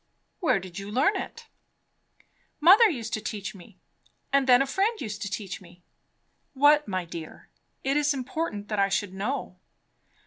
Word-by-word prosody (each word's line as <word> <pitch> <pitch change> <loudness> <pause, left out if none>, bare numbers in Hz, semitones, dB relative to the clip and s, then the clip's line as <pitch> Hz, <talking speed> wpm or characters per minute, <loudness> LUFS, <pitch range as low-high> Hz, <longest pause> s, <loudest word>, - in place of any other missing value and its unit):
Where 325 - +2
did 185 0 -8
you 200 +1 -7
learn 265 - +2
it?" - - -6 1.1
"Mother 395 +9 +7
used 235 - -4
to 215 - -1
teach 210 -2 -5
me 195 0 -15 0.6
and 275 -1 +3
then 250 -1 +7
a 275 - +2
friend 400 - 0
used 215 -5 -5
to 205 - -3
teach 195 0 -5
me." 175 -1 -17 0.7
"What, 295 +2 +5
my 185 -2 -2
dear? 165 -1 -9 0.3
It 270 +1 +1
is 295 0 +2
important 260 -5 -3
that 210 -2 -1
I 195 0 +3
should 195 -1 -1
know." 200 -1 -4
220 Hz, 165 wpm, -27 LUFS, 195-285 Hz, 1.1 s, Mother